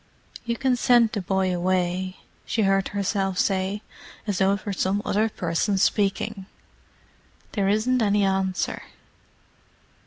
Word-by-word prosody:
"You 235 0 -1
can 265 -2 +2
send 240 -2 +4
the 205 - -2
boy 185 0 0
away," 185 +1 -1 0.3
she 225 - 0
heard 195 -1 +2
herself 195 -1 -1
say, 195 +2 0 0.4
as 205 -4 -1
though 195 0 +4
it 200 - -5
were 205 - -2
some 195 +2 0
other 215 +2 +1
person 185 +2 -1
speaking. 195 0 0 1.0
"There 195 -2 0
isn't 235 +5 +2
any 205 -1 +2
answer. 190 -1 0
195 Hz, 130 wpm, -24 LUFS, 190-215 Hz, 1.0 s, send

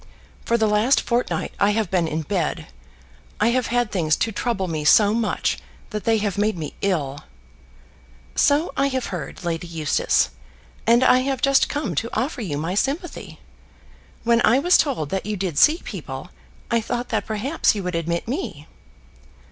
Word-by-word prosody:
For 235 - +2
the 220 - +2
last 215 +5 +3
fortnight 240 +1 -1
I 200 - +4
have 215 -3 -1
been 175 -3 +2
in 160 0 -2
bed. 170 -1 -2 0.7
I 215 - +3
have 250 0 +1
had 245 -2 0
things 160 -5 +1
to 225 - -1
trouble 210 -3 -2
me 155 -3 -3
so 205 +7 +5
much 225 -2 0 0.3
that 210 -2 -4
they 225 -1 +3
have 205 -2 -2
made 210 -2 +1
me 150 -3 -5
ill." 145 -8 -1 1.1
"So 295 +4 +2
I 275 - +2
have 260 -6 -3
heard, 165 -3 -6
Lady 170 +1 -2
Eustace, 155 - +1 0.6
and 235 +2 +5
I 255 - +6
have 265 0 -1
just 275 0 +3
come 280 - -2
to 225 +10 -2
offer 265 0 -2
you 160 -9 -3
my 165 +4 -2
sympathy. 285 - -3 0.8
When 235 0 +3
I 235 - +5
was 355 +6 +4
told 250 - +1
that 190 +1 -2
you 210 -1 -2
did 180 -6 -1
see 320 +4 +5
people, - - -7 0.4
I 230 -1 +3
thought 240 +2 -3
that 215 -3 -1
perhaps 220 +6 +1
you 200 - -3
would 180 0 -3
admit 170 +2 -2
me." 230 - -4
215 Hz, 175 wpm, -22 LUFS, 170-245 Hz, 1.1 s, I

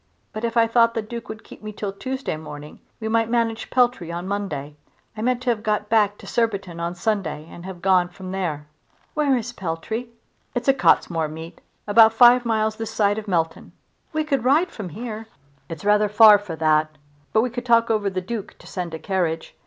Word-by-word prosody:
But 215 - -6
if 235 0 -1
I 230 - +6
thought 230 0 +3
the 225 - -1
Duke 230 +1 -8
would 220 0 -8
keep - - -14
me 215 0 -6
till 205 -1 -5
Tuesday 260 0 -4
morning 150 -1 -10 0.2
we 220 - -4
might 225 0 +1
manage 230 -1 -1
Peltry 245 -9 +1
on 175 +2 -5
Monday. 150 -8 -4 0.4
I 215 - -6
meant 250 +1 0
to 250 - +2
have 220 -2 -2
got 210 -1 -1
back 210 -2 +3
to - - -13
Surbiton's 200 -7 -1
on 170 +1 -3
Sunday 195 -6 -2
and 175 +1 -11
have 180 -3 -9
gone 185 -2 +3
from 185 +1 -9
there." 170 -6 -3 0.5
"Where 285 -4 +2
is 240 +1 -5
Peltry?" 205 +6 -4 0.5
"It's 245 - -2
a 270 - +6
Cottesmore 165 -10 +2
meet, 160 +2 -9 0.2
about 220 +1 +6
five 245 +1 +6
miles 220 -1 0
this 225 -1 -4
side 205 0 +1
of 215 - -10
Melton." 165 -4 -2 0.4
"We 310 -1 0
could 275 -5 -1
ride 295 +8 +3
from 200 -5 -7
here." 220 +3 -7 0.4
"It's 165 +3 -7
rather 210 0 +4
far 210 0 +8
for 195 -5 -7
that, 155 -1 +1 0.3
but 220 - +3
we 245 +1 -1
could 245 +1 -6
talk 230 -1 +4
over 210 -2 +1
the 185 -1 -3
Duke 210 +2 -6
to - - -17
send 175 -4 -5
a - - -4
carriage. 165 -3 -2
210 Hz, 205 wpm, -23 LUFS, 175-230 Hz, 0.5 s, far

